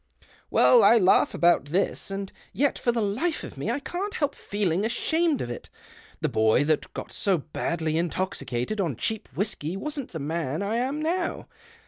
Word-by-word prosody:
Well, - - +6
I 235 - +7
laugh 190 -3 +4
about 175 -4 +4
this, 180 +8 -1
and 195 0 -4 0.2
yet 285 +1 +1
for 240 - +2
the 230 -2 0
life 255 +12 -1
of - - -8
me - - -3
I - - 0
can't 380 +8 -4
help 290 -2 0
feeling 200 -2 -1
ashamed 315 +7 +1
3f 120 - -4
it. 120 - -8 0.5
The - - +2
boy 110 +4 +3
that 155 +1 0
got - - -6
so 195 -3 +1
badly 160 +1 -2
intoxicated 175 - -2
3u 165 - -1
cheap 220 -1 -3
whisky 180 -2 -2
wasn't 290 +2 -5
the 165 - -5
man 155 +2 -2
I 215 +3 -1
am 270 +5 -1
now. 345 +2 -1
200 Hz, 175 wpm, -26 LUFS, 160-270 Hz, 0.5 s, I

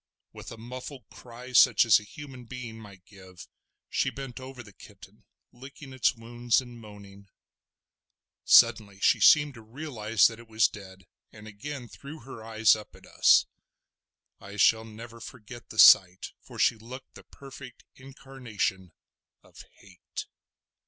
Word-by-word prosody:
With - - -11
a 115 - -10
muffled 125 +3 -10
cry, 125 +1 -12
such 120 -4 +5
as 115 - +5
a - - -14
human 130 +1 -12
being 115 -2 -9
might 100 -4 -15
give, 95 -3 -15 0.4
she - - -1
bent 135 -2 -9
over 130 -1 -10
the 105 -2 -17
kitten - - -17 0.3
licking 135 +2 -13
its 130 0 +1
wounds 120 +1 -1
and 120 -2 -10
moaning. 100 -2 -15 1.1
Suddenly 100 -3 +4
she - - +3
seemed 150 -2 +5
to 115 - -13
realise 115 -3 -1
that 115 0 +1
it 115 - -15
was 110 -1 +2
dead, 95 -2 -13 0.3
and 105 0 -14
again 125 +5 -8
threw 140 +6 -12
her 115 -2 -11
eyes 110 0 +3
up 105 -1 -12
at - - -18
us. - - +4 0.9
I 100 +1 -11
shall 110 +2 +3
never 115 +1 -12
forget 120 0 -12
the 110 - -12
sight, 95 -3 +6
for - - -14
she - - +2
looked 125 +4 -12
the - - -14
perfect 135 -2 -14
incarnation 125 -9 -6 0.5
of - - -16
hate. 95 -2 -11
115 Hz, 150 wpm, -27 LUFS, 105-130 Hz, 1.1 s, sight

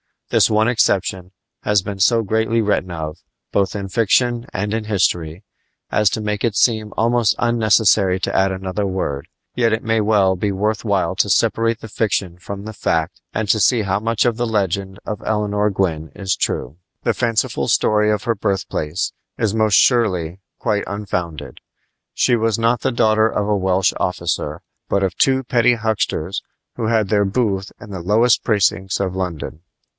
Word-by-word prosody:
This - - +4
one 110 0 +2
exception 95 -5 0 0.3
has 105 -2 +2
been 100 -1 -6
so 115 +4 +3
greatly 110 +2 +1
written 105 -3 0
of, 80 -2 -5 0.3
both 100 0 0
in 100 -1 -4
fiction 120 +3 +1
and 105 +2 -2
in 110 -1 -2
history, 90 -4 -1 0.5
as 105 -1 +3
to 110 - -2
make 105 -1 -2
it 115 -3 -1
seem 110 -1 +1
almost 115 -1 +2
unnecessary 110 -5 +3
to - - -2
add 95 0 +3
another 95 +2 -3
word; 75 -7 -3 0.3
yet 115 -2 +2
it 110 - -1
may 115 0 +1
well 100 -3 +3
be 100 +2 -1
worth 105 +2 -1
while 100 -5 0
to - - +2
separate 115 0 +1
the 115 - -9
fiction 95 -5 -1
from 100 +2 -7
the 110 - -6
fact 80 -5 -1
and 110 -2 -2
to 110 - +3
see 120 +2 +3
how 100 -1 0
much 115 +2 0
of 120 -2 +1
the 120 0 -1
legend 100 -2 -1
of 105 - -5
Eleanor 105 -1 0
Gwyn 80 -6 -2
is 95 -2 -1
true. 70 +6 -2 0.3
The - - +1
fanciful 115 -2 0
story 105 0 +2
of 105 -1 0
her 115 - +1
birthplace 95 -5 -2 0.3
is 110 -3 0
most 110 -2 +2
surely 95 -10 +2 0.2
quite 105 -3 -1
unfounded. 90 -6 -4 0.5
She 120 - +2
was 115 -1 0
not 115 +1 +1
the - - 0
daughter 110 -1 +3
of 105 -2 -2
a 105 - +2
Welsh 95 0 +1
officer, 90 - -2 0.3
but 100 - +1
of 95 -2 0
two 135 0 +3
petty 125 -2 +3
hucksters 110 -5 -2 0.4
who 115 -2 -1
had 110 -3 +1
their 105 -1 +2
booth 100 -2 -1
in 105 - -11
the 95 - -5
lowest 110 +7 +3
precincts 95 -2 +1
of 95 -2 -1
London. 85 -4 -4
105 Hz, 175 wpm, -19 LUFS, 95-110 Hz, 0.5 s, This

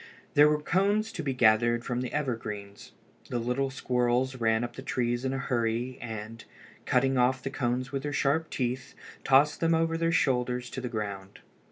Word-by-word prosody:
There 150 +1 +7
were 150 0 +1
cones 200 +7 +1
to - - -5
be 135 -4 -2
gathered 120 0 +3
from 125 0 -2
the 125 - -4
evergreens. 110 -8 -4 0.4
The 125 - -1
little 125 +3 -1
squirrels 125 0 0
ran 110 -1 +2
up 120 0 -5
the - - -7
trees 120 -2 -1
in 130 - -1
a 135 - -2
hurry, 120 -1 -1
and, 115 -1 -7 0.4
cutting 135 +1 +2
off 125 +1 +2
the 135 - -3
cones 125 -1 -2
with 135 -1 -2
their 145 +1 -3
sharp 150 +3 +1
teeth, 130 +2 -3 0.3
tossed 140 +3 +4
them 165 0 +3
over 165 0 +1
their 165 0 +1
shoulders 125 -5 0
to 130 - -5
the 125 - -4
ground. 100 -3 -5
125 Hz, 185 wpm, -28 LUFS, 120-140 Hz, 0.4 s, There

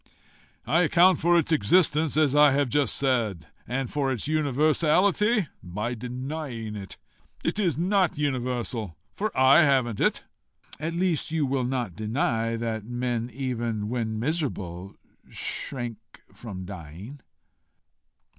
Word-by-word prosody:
"I 170 - +3
account 175 +3 +5
for 175 +1 +4
its 165 -1 +1
existence 155 - +3
as 150 -3 +3
I 150 -1 +6
have 140 -2 +1
just 145 +2 +1
said; 115 - 0 0.2
and 130 +1 -2
for 140 -2 0
its 125 0 -3
universality 155 - +2
by 105 +7 -4
denying 125 -1 -5
it. 100 -2 -8 0.5
It - - -1
is 175 -9 +1
NOT 185 0 +1
universal, 125 - -2 0.2
for 215 +2 -2
I 130 +5 +7
haven't 130 -7 +2
it." - - +1 0.6
"At 160 +2 -3
least 175 -3 0
you 160 -2 0
will 130 -1 0
not 120 -8 -2
deny 115 +1 -1
that 115 -2 -3
men, 120 0 -2
even 120 -4 -3
when 110 -3 -2
miserable, 105 - -3 0.3
shrink 120 -5 -4 0.4
from 95 -6 -8
dying?" 95 - -9
130 Hz, 125 wpm, -26 LUFS, 115-155 Hz, 0.6 s, I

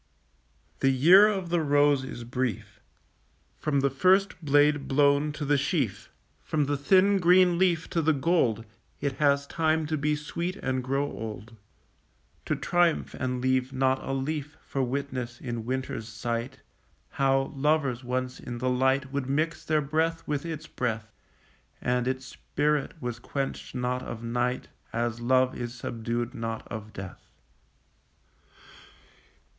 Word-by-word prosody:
The 135 - +3
year 170 +11 +7
of 190 -5 -2
the 170 -1 +2
rose 145 -2 +3
is 120 -2 -7
brief; 115 -4 -3 0.8
From 140 -3 +1
the 140 0 +2
first 185 +6 +2
blade 145 0 +3
blown 145 +2 +3
to 150 0 -4
the 145 0 +3
sheaf, 130 - -1 0.3
From 150 -2 0
the 145 +1 0
thin 190 +7 +4
green 180 0 +5
leaf 180 -3 +2
to 165 - +1
the 160 0 +3
gold, 135 - +1 0.3
It 140 -2 -2
has 140 -1 +3
time 160 +1 +1
to 155 +1 -1
be 150 +1 +1
sweet 170 +5 -4
and 130 -9 -2
grow 135 +2 0
old, 110 -4 -7 0.9
To - - 0
triumph 175 -2 +1
and 125 -1 -2
leave 130 0 +1
not 130 0 +1
a - - -4
leaf 150 +3 -3
For 135 - -2
witness 130 -2 -3
in 120 -3 -5
winter's 130 -4 -3
sight 115 +3 -4 0.5
How 135 0 +1
lovers 140 -3 +1
once 125 +1 -3
in 120 -1 -6
the 130 +2 0
light 130 +1 +1
Would 140 -2 -2
mix 155 +4 0
their 155 -1 +1
breath 160 +3 -1
with 150 +2 -2
its 160 -1 -5
breath, 115 -6 -3 0.7
And 125 0 0
its 130 0 -2
spirit 150 +3 -1
was 120 -3 -4
quenched 135 +1 -4
not 125 0 -1
of 115 -2 -7
night, 120 +2 -1 0.2
As 120 0 -2
love 130 +1 +3
is 120 0 -5
subdued 120 0 -3
not 115 -1 -5
of 110 -1 -7
death. 95 -2 -8
135 Hz, 145 wpm, -27 LUFS, 125-150 Hz, 0.9 s, year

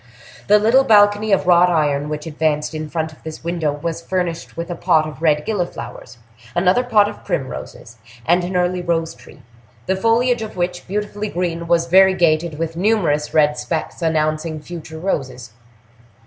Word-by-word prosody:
The 210 - +6
little 230 +6 +4
balcony 205 -1 +4
of 195 - +2
wrought 180 0 +5
iron 150 -3 0
which 150 0 -5
advanced 155 -1 -1
in 155 -1 -5
front 160 0 -3
of - - -20
this 160 0 -9
window 170 -3 -1
was 160 +3 -4
furnished 170 -2 -3
with 170 +1 -4
a - - -3
pot 160 -3 +2
of 155 0 -10
red 150 -2 +2
gilliflowers, 175 - -5 0.4
another 180 +6 +3
pot 215 -4 +3
of 210 - -9
primroses, 125 -3 -5 0.3
and 175 +2 +3
an 180 +1 -4
early 180 0 0
rose 165 -2 -1
tree, 125 +2 -17 0.4
the 190 - 0
foliage 230 +4 +2
of 215 -3 -7
which, 175 0 -3
beautifully 210 +1 -3
green, 170 -2 -3
was 170 0 +2
variegated 170 -3 +3
with 165 0 -3
numerous 170 -7 +1
red 150 -4 +3
specks 155 +8 -4
announcing 155 0 -1
future 160 0 -9
roses. 130 - -4
170 Hz, 165 wpm, -19 LUFS, 155-190 Hz, 0.4 s, The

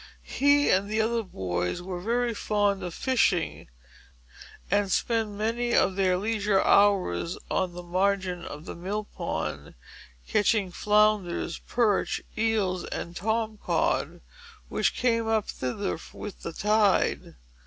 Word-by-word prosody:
He 285 +1 +3
and 195 +2 +2
the 215 +1 0
other 230 +1 +1
boys 90 - -3
were 180 0 -5
very 235 +3 0
fond 205 -2 0
of 180 -1 -4
fishing, 235 -9 +1 1.0
and 200 0 +2
spent 220 -2 0
any 235 +2 0
of 190 - +3
their 185 -2 +2
leisure 210 -1 +1
hours 190 - +3
on 185 -2 0
the 180 0 -8
margin 185 0 0
of 150 0 -8
the - - -6
mill 195 +5 -3
pond, - - -5 0.5
catching 205 -2 +2
flounders, 210 -4 +1
perch, 225 -5 +1 0.2
eels, 215 -5 0
and 170 - -6
tom 220 +2 -1
cod, - - 0 0.5
which - - 0
came 230 -2 +1
up 220 -2 +1
thither 130 +11 -3 0.2
with 210 -3 -8
the 165 - -5
tide. 210 0 +2
205 Hz, 130 wpm, -27 LUFS, 180-220 Hz, 1.0 s, He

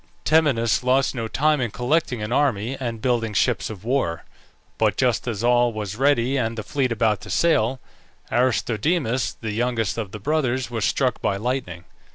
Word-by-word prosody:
Temenus 140 -8 +3
lost 130 +2 +2
no 115 -4 -3
time 150 +4 +1
in 120 - 0
collecting 125 -1 -1
an 105 - -4
army 125 -3 +1
and 115 -4 -4
building 115 -4 0
ships 120 +3 +1
of 105 -3 -9
war; 115 -9 -1 0.6
but - - +2
just 125 -4 +1
as 110 -2 -3
all 120 0 +3
was 105 -2 -5
ready 135 0 +2
and 115 -2 -1
the 110 - -4
fleet 130 +2 -1
about 110 -2 +1
to - - -10
sail, 130 -7 +2 0.5
Aristodemus, 125 - +1
the 110 -2 -6
youngest 115 -1 -1
of 105 -4 -4
the 105 - -7
brothers, 130 -1 -1
was 110 -3 -1
struck 130 -2 0
by 100 - 0
lightning. 105 -7 -3
120 Hz, 175 wpm, -23 LUFS, 110-130 Hz, 0.6 s, Temenus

